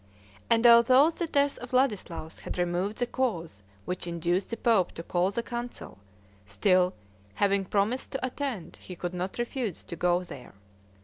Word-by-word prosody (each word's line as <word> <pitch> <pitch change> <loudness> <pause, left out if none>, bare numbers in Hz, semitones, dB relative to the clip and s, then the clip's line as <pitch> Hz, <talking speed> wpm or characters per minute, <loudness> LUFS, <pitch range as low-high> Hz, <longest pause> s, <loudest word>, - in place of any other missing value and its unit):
And 230 +1 +3
although 255 +6 +7
the 340 +1 -3
death 285 -2 +1
of 245 0 -9
Ladislaus 205 -11 0
had - - -6
removed 180 +4 -1
the 245 - 0
cause 185 - -2 0.2
which 180 -1 -3
induced 170 +2 -1
the 230 - -4
pope 220 -6 +2
to 165 - -7
call 175 +2 +1
the 235 +4 -3
council, 240 - -7 0.5
still, 185 - +2 0.4
having 200 -1 +2
promised 210 +7 0
to 270 - -2
attend, 255 - -4
he 180 - -10
could 175 +1 -4
not 180 +1 -4
refuse 240 - -3
to 170 - -7
go 175 +1 +1
there. 130 - -11
200 Hz, 165 wpm, -28 LUFS, 180-245 Hz, 0.5 s, although